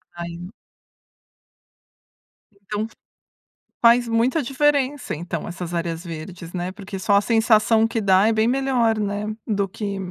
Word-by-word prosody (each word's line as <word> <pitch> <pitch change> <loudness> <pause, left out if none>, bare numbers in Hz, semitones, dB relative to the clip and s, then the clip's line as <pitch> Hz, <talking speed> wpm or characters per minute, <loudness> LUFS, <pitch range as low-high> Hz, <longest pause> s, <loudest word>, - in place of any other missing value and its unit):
Aí 175 +2 -7 2.0
Então 210 +1 -5 1.0
Faz 235 +1 +6
muita 240 +7 +1
diferença, 285 - 0
então, 170 +1 -5
essas 175 0 -6
áreas 170 0 -3
verdes, 170 +1 -8
né, 180 +1 -3
porque 195 -1 -8
só 200 +2 +2
a 200 - +5
sensação 225 0 +3
que 225 - -2
dá 195 +1 +4
é 225 - +4
bem 220 +1 +2
melhor, 245 -4 +1
né, 205 0 -2 0.2
do 200 -3 0
que 200 +1 -5
205 Hz, 130 wpm, -22 LUFS, 180-230 Hz, 2.0 s, Faz